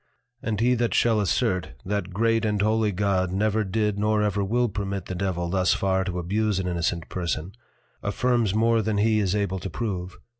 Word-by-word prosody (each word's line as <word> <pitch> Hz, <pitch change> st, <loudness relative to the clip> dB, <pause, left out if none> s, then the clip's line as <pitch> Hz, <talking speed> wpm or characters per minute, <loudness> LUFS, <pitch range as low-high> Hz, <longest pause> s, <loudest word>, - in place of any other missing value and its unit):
_ -, -, -45 dB, 0.4 s
And 110 Hz, -3 st, -2 dB
he 125 Hz, +2 st, +3 dB
that 120 Hz, -1 st, 0 dB
shall 115 Hz, -2 st, +3 dB
assert, 90 Hz, -5 st, 0 dB
that 100 Hz, -1 st, -2 dB
Great 115 Hz, +4 st, +1 dB
and 105 Hz, -2 st, 0 dB
Holy 110 Hz, +1 st, +2 dB
God 95 Hz, -2 st, 0 dB
never 110 Hz, +3 st, +1 dB
did 105 Hz, +1 st, -1 dB
nor 105 Hz, 0 st, +2 dB
ever 105 Hz, -1 st, 0 dB
will 120 Hz, +5 st, +1 dB
permit 100 Hz, -2 st, -4 dB
the -, -, -5 dB
Devil 90 Hz, -2 st, -2 dB
thus 95 Hz, -1 st, +2 dB
far 95 Hz, -1 st, +1 dB
to 90 Hz, -2 st, -3 dB
abuse 105 Hz, +3 st, 0 dB
an 95 Hz, -1 st, -1 dB
Innocent 85 Hz, -1 st, -1 dB
Person, 85 Hz, -1 st, -3 dB, 0.5 s
affirms 115 Hz, 0 st, +1 dB
more 115 Hz, +1 st, +3 dB
than 110 Hz, 0 st, -1 dB
he 110 Hz, +1 st, +3 dB
is 100 Hz, -1 st, +1 dB
able 100 Hz, -2 st, -1 dB
to 95 Hz, -, -5 dB
prove. 95 Hz, -6 st, -4 dB
100 Hz, 195 wpm, -25 LUFS, 95-110 Hz, 0.5 s, he